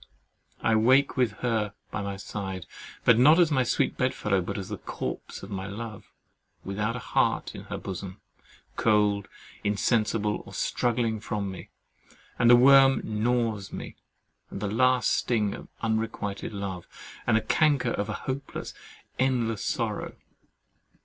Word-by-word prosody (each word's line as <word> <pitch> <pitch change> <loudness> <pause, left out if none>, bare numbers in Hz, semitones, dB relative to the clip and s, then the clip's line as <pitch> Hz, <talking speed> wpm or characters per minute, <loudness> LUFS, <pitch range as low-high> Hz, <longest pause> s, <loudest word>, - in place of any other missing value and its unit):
I 115 - +3
wake 130 +5 +4
with 125 -5 +2
her 110 -4 0 0.2
by 105 - -3
my 100 -1 -4
side, 95 -2 -5 0.4
not 125 +8 +7
as 170 -3 +4
my 130 -3 +3
sweet 125 - 0
bedfellow, 105 -6 +1
but 90 - -4
as 95 0 -5
the 105 - -5
corpse - - -6
of 100 - -9
my 95 -1 -4
love, 105 +1 -7 0.6
without 105 +4 -2
a 125 - -7
heart - - +1
in - - -9
her - - -5
bosom, 95 +1 -6 0.6
cold, 105 -2 +2 0.4
insensible, 105 0 +1
or - - -12
struggling 115 -2 0
from 105 -2 -3
me; 95 - -9 0.7
and 120 - +5
the 120 - +10
worm 135 +2 +7
gnaws 110 -2 -1
me, - - -7 0.5
and - - -6
the 125 +5 +3
sting 110 -1 +1
of - - -9 0.2
unrequited 110 -3 -2
love, 100 -4 -5 0.4
and 110 -2 +4
the - - +1
canker 140 -5 +2
of 105 -1 -2
a - - -1
hopeless, 135 +1 -4 0.5
endless 120 -5 +1
sorrow. - - -2
110 Hz, 145 wpm, -27 LUFS, 100-125 Hz, 0.7 s, the